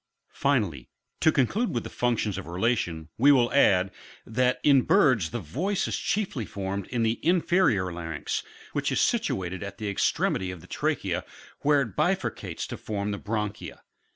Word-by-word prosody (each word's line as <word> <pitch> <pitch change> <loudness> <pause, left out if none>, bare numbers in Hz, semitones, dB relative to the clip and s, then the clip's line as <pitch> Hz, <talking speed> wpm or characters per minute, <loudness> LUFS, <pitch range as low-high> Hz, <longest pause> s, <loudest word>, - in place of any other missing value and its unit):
Finally, 105 - 0 0.3
to 160 - +5
conclude 170 - +1
with 120 - -1
the - - -6
functions 115 -4 0
of 95 - -9
relation, 85 -4 -1
we 140 +4 +7
will 125 -4 +3
add, 95 -9 +4 0.3
that 125 +2 +1
in 140 -3 +6
birds 125 - +3
the 120 - -3
voice 155 - -2
is - - -1
chiefly 195 - -1
formed 100 -1 -4
in 120 -2 -1
the 115 +1 0
inferior 170 - +2
larynx, 80 -3 -3 0.3
which - - 0
is - - +1
situate 95 0 0
at 100 -1 -6
the 105 -1 -4
extremity 95 -1 0
of 90 -1 -6
the - - -15
trachea, - - -1 0.4
where 145 -1 +3
it 115 -8 -4
bifurcates - - -1
to - - -6
form 105 -1 -3
the 100 - -4
bronchia. 105 -1 -4
110 Hz, 165 wpm, -27 LUFS, 95-135 Hz, 0.4 s, we